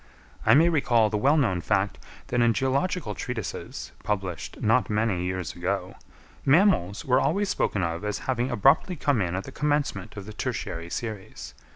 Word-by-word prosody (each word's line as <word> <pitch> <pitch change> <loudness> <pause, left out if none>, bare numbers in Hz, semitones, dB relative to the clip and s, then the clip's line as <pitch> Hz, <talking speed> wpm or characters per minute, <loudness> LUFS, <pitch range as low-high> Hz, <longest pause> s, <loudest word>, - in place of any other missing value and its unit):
I - - +7
may 160 +4 +6
recall 120 -9 +3
the 105 - 0
well 140 +7 +4
known 95 - +1
fact - - 0 0.3
that 120 - +1
in 120 -1 +4
geological 135 - 0
treatises, 110 -1 -5
published 95 -5 -3
not 115 +3 +2
many 105 -4 0
years 90 -2 -3
ago, 90 +1 -2 0.5
mammals 135 - +3
were 130 0 +4
always 200 0 +1
spoken 95 - 0
of 85 +1 -2
as 105 0 -2
having 125 -1 0
abruptly 135 - +3
come 145 -6 +1
in 90 -1 -1
at 95 - -2
the 135 - -9
commencement 145 -10 -1
of 100 - -6
the 110 - -9
tertiary 105 -9 -4
series. 110 -1 -6
115 Hz, 170 wpm, -26 LUFS, 95-135 Hz, 0.5 s, I